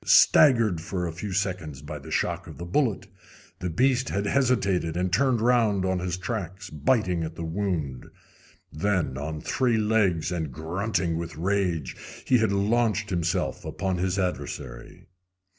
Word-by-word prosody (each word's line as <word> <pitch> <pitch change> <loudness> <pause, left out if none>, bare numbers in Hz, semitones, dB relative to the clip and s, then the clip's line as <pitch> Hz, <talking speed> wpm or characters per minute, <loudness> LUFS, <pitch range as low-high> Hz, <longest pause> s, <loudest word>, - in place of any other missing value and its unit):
Staggered 115 - +5
for 90 +1 -3
a 85 - -2
few 95 +4 -5
seconds 90 -8 -2
by 75 0 -6
the 70 - -11
shock - - -1
of - - -10
the 85 - -6
bullet, 110 +3 0 0.5
the 90 - -2
beast 130 +8 +2
had 100 +1 -1
hesitated 100 -10 +1
and 90 0 -1
turned 130 +2 +3
around 110 -5 +3
on 95 -1 0
his 90 -1 -2
tracks, 95 -1 -5
biting 90 - +1
at 80 +1 -5
the 85 - -5
wound. 80 -7 -2 0.7
Then, 90 -4 0
on 75 +3 -4
three 120 - +1
legs, 105 -7 +2
and 80 -5 -2
grunting 85 - -1
with 85 -1 -6
rage, 90 -5 0 0.3
he 125 - +4
had 110 -2 +2
launched 105 0 +1
himself 85 +1 -1
upon 95 -2 -2
his 95 +1 0
adversary. 90 -9 -4
95 Hz, 155 wpm, -26 LUFS, 85-105 Hz, 0.7 s, Staggered